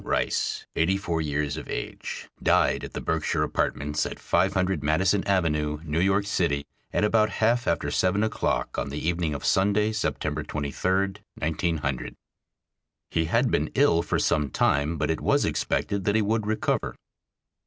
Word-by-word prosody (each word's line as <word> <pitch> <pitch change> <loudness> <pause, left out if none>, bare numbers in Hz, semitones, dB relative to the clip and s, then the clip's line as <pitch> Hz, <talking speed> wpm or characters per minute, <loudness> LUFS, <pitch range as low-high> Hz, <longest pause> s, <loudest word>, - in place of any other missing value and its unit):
Rice, - - -1
eighty 90 +4 +2
four 85 -4 -2
years 75 0 -1
of 80 - -8
age, - - -5
died - - +3
at - - -7
the - - -4
Berkshire - - 0
Apartments 75 +2 -1
at - - -7
500 95 -4 +1
Madison 95 +6 +2
Avenue, 75 -6 +1
New 80 0 -1
York 95 +2 +2
City, 80 -8 0 0.3
at - - 0
about 110 0 +3
half 120 +3 +1
after 85 - 0
seven 95 +3 +2
o'clock 110 - -1
on 70 - -3
the 70 - -5
evening 85 -1 -1
of 70 - -6
Sunday, 105 +3 +3
September 110 -1 -2
23, 95 +7 -1 0.2
1900. 80 -4 -2 1.0
He 80 - +1
had 115 - +2
been 75 +2 +1
ill 135 -12 +4
for - - -1
some 75 -2 +1
time, 70 +5 +1
but 75 +1 0
it 80 - -2
was - - +2
expected 100 -2 -1
that 100 - +2
he 110 - +4
would 110 0 0
recover. 110 0 -1
85 Hz, 160 wpm, -26 LUFS, 75-100 Hz, 1.0 s, ill